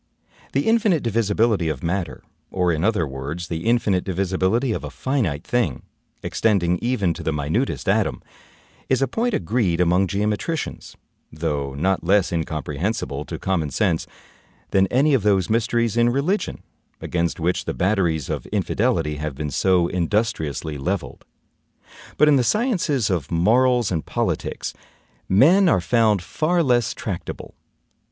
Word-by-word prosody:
The 140 - 0
INFINITE 215 -8 +3
DIVISIBILITY 110 -4 +1
of 80 - -4
matter, 85 -6 -3 0.3
or, 90 -2 +1
in 80 0 -1
other 105 -5 +2
words, 75 +5 -6
the 85 +5 -4
INFINITE 105 -6 +2
divisibility 95 +6 0
of - - -3
a - - -5
FINITE 105 - -2
thing, 105 - -1 0.4
extending 90 -6 +1
even 110 -8 0
to 85 - -8
the 80 - -1
minutest 80 - -2
atom, 105 +2 +1 0.7
is 130 0 +2
a - - +1
point 230 - -1
agreed 95 -2 0
among 90 +2 +3
geometricians, 105 - -3 0.4
though 75 -3 -3
not 95 +6 0
less 95 +2 +2
incomprehensible 75 0 -3
to - - -6
common 90 -6 -1
sense 90 -2 0 0.6
than 95 0 +3
any 140 +8 +2
of 130 - +3
those 100 -2 +2
mysteries 115 0 +1
in 120 0 +4
religion, 145 - -1 0.4
against 85 -1 -2
which 85 +2 -1
the - - -2
batteries 90 -6 +1
of - - -4
infidelity 95 -5 0
have 75 -2 -4
been 75 +1 -4
so 90 0 +2
industriously 85 - -1
leveled. 90 +6 -4 0.9
But 150 - +5
in 145 -2 +5
the 125 - +2
sciences 170 - +1
of 85 -7 -2
morals 120 +6 +3
and 80 -3 -1
politics, - - -3 0.6
men 170 - +5
are 95 - +3
found 105 0 +2
far 165 - 0
less 120 -4 +1
tractable. 95 -5 -6
95 Hz, 145 wpm, -22 LUFS, 85-120 Hz, 0.9 s, But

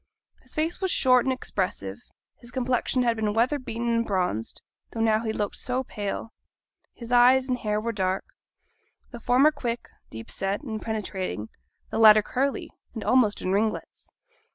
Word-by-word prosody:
His 255 - -13
face 320 +4 -1
was 380 - 0
short 255 -6 +4
and - - +3
expressive; 180 - -3 0.4
his 240 - -12
complexion 250 0 0
had 235 -1 +2
been 215 -1 -1
weatherbeaten 240 -1 0
and 230 0 +2
bronzed, 180 - -2 0.3
though 225 - -6
now 220 0 +2
he 220 - -1
looked 210 -2 -3
so 255 +1 -1
pale; 210 -1 -5 0.6
his 235 0 -10
eyes 255 +2 +5
and 250 -1 -1
hair 210 -1 -1
were 230 +2 -2
dark, 190 -3 -1 0.9
the 240 - -8
former 255 +6 +4
quick, 240 -5 -4 0.2
deep 110 0 -8
set, 195 +1 -2
and 220 -6 -5
penetrating; 190 - -4 0.4
the - - -1
latter 215 -1 +8
curly, 270 +5 -2 0.2
and 220 - -4
almost 245 -5 +3
in 185 - -1
ringlets. 215 +2 -2
230 Hz, 160 wpm, -26 LUFS, 210-250 Hz, 0.9 s, latter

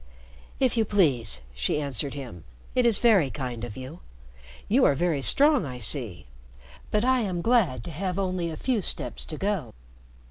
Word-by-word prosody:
"If 255 -3 +2
you 225 - +4
please," 135 - +2
she 60 - 0
answered 140 -1 -2
him. 120 - -8 0.3
"It 250 -1 +3
is 225 -4 +5
very 200 - +4
kind 125 -4 -5
of 120 -4 -6
you. 130 +6 -8 0.7
You - - +3
are 140 - +5
very 165 -2 0
strong, 285 - +4
I 130 -4 -6
see. 105 - -4 0.6
But 210 +2 +1
I 260 0 +3
am 185 -6 -2
glad 205 - +2
to - - -7
have 180 +3 -3
only 185 -3 -1
a 160 - -6
few 245 - 0
steps - - -4
to 155 - -6
go." 190 - -2
165 Hz, 175 wpm, -26 LUFS, 130-210 Hz, 0.7 s, is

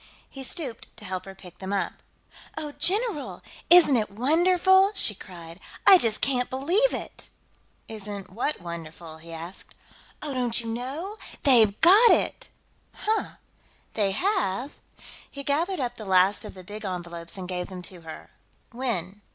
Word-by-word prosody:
He 270 - -9
stooped 265 -3 -5
to 210 - -11
help 185 -1 -4
her 195 0 -10
pick 180 -2 -14
them 190 0 -5
up. 200 -1 -1 0.6
"Oh, 305 -2 -4
general! 385 - 0 0.3
Isn't 345 -6 +8
it 215 -4 0
wonderful?" 355 - +4
she 215 - +1
cried. 170 -3 -11 0.3
"I 380 - +9
just 225 -6 +1
can't 250 -3 +2
believe 345 - +2
it!" - - -6 0.6
"Isn't 205 -3 -7
what 245 +9 -2
wonderful?" 165 -1 -8
he 165 +1 -12
asked. 165 +3 -8 0.5
"Oh, 295 -2 -3
don't 245 -3 +1
you 235 - -5
know? 270 - -5 0.3
They've 225 -7 +5
got 410 +8 +8
it!" - - +1 0.5
"Huh? 435 +1 -1 0.6
They 205 -3 +1
have?" 285 - -1 0.6
He 280 - -8
gathered 330 +7 0
up 245 -2 -3
the 215 - -8
last 190 +3 +3
of 210 - -9
the 185 - -11
big 210 +4 -9
envelopes 175 -2 -6
and 185 -1 -6
gave 180 -1 -3
them 185 -2 -9
to 175 -1 -8
her. 160 -1 -10 0.4
"When?" 210 -6 -3
225 Hz, 155 wpm, -26 LUFS, 185-300 Hz, 0.6 s, I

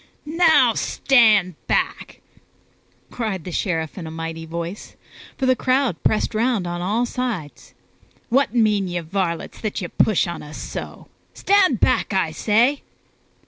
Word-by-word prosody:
"Now, 310 -6 +4
stand 215 -11 +3
back!" - - -2 0.9
cried 215 -7 -3
the 180 - -7
Sheriff 165 -1 -2
in 165 - -6
a - - -6
mighty 165 0 -6
voice, 170 +4 -6 0.4
for 265 - -1
the 255 0 +4
crowd 255 - 0
pressed 215 - 0
around 225 -3 0
on 175 0 -4
all 215 +7 0
sides. 235 - -5 0.5
"What 250 -1 +2
mean 210 -4 +2
ye, 175 0 -2
varlets, 170 0 -3
that 215 -2 -3
ye 180 - -4
push 215 -4 +2
upon 170 -1 -5
us 150 +1 -10
so? - - -7 0.3
Stand 380 - +3
back, - - +2
I 185 -4 +1
say!" 230 - +2
210 Hz, 145 wpm, -21 LUFS, 170-245 Hz, 0.9 s, Now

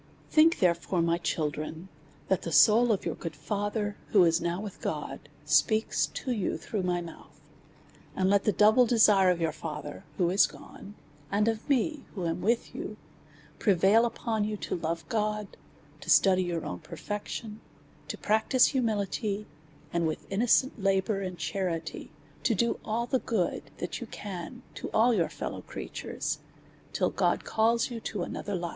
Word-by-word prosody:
Think, 320 +2 +5
therefore, 170 0 +1
my 170 0 +1
children, 155 +1 -3 0.4
that 190 - +1
the 165 - -5
soul 220 +10 +6
of 205 - 0
your - - -1
good 165 -2 -6
father, 205 +6 -2 0.2
who 195 -4 +7
is 165 0 +3
now 175 +1 -1
with 205 -2 -7
God, - - -4 0.2
speaks 220 0 +3
to 260 - -5
you 210 -6 -1
through 210 - -3
my 180 -1 0
mouth; 170 -1 -12 0.8
and 185 - +1
let 200 +1 +3
the 210 - +4
double 220 +4 +5
desire 210 -5 +5
of 180 -1 +1
your 165 -1 +1
father, 150 -2 -7
who 175 -1 +2
is 190 +1 +5
gone, 205 +1 -12 0.4
and 210 +2 +2
I, 255 +6 +1 0.2
who 185 -4 -3
am 165 +2 -2
with 230 +4 0
you, - - -6 0.6
prevail 200 +4 +4
upon 225 -2 -2
y<^u 210 0 -3
to - - -2
love 165 -1 -3
God, 210 -3 -2 0.4
to - - -10
study 185 -1 +5
your 175 -2 -2
onn 90 -9 -6
perfection, 210 +1 -6 0.5
to - - -5
practise 220 +4 +3
humility, 215 -4 -1 0.5
and, 170 -1 +1
with 155 - -4
innocent 235 +4 +2
labour 195 +1 +1
and 185 -2 -4
charity, 165 0 -3 0.3
to 230 - +2
do 235 +4 +1
all 225 +2 -1
the 255 +2 +1
good 205 -9 -2
that - - -4
you 240 - -5
can 205 +4 -7
to - - -6
all 235 +3 +5
jour 170 -5 +1
fel - - -5
low - - -7
creatures, - - -5 0.5
till - - 0
God - - +1
calls 230 +2 +2
you 235 - -4
to 210 -4 -4
another 200 +3 -4
life. 175 -1 -3
200 Hz, 165 wpm, -29 LUFS, 175-220 Hz, 0.8 s, who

